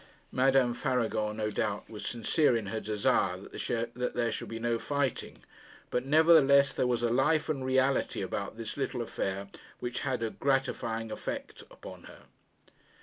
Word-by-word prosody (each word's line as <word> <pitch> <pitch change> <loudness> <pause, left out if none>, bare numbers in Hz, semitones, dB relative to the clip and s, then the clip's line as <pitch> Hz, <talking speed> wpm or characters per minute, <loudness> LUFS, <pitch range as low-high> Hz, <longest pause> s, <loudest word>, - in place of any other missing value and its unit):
Madame 130 -1 +3
Faragon 120 -5 -1
no 105 -1 -1
doubt 100 0 -2
was 105 -2 -8
sincere 120 +3 +2
in 110 - -4
her 110 - -1
desire 100 -3 +1
that 120 +5 -3
there 120 -1 +1
should - - -5
be 115 - -5
no 115 0 0
fighting; 140 -2 -2 0.5
but, 125 - 0
nevertheless, 145 -3 +6
there 125 - +1
was 120 -1 0
a - - +3
life 150 +5 +2
and 140 -4 -1
reality 130 -4 +1
about 100 +3 -4
this 115 +2 -6
little 130 -3 -2
affair 100 -3 -3 0.3
which 120 0 -3
had 130 -4 -2
a 110 - -1
gratifying 115 -5 -1
effect - - -5
upon - - -11
her. - - -14
120 Hz, 155 wpm, -30 LUFS, 110-135 Hz, 0.5 s, nevertheless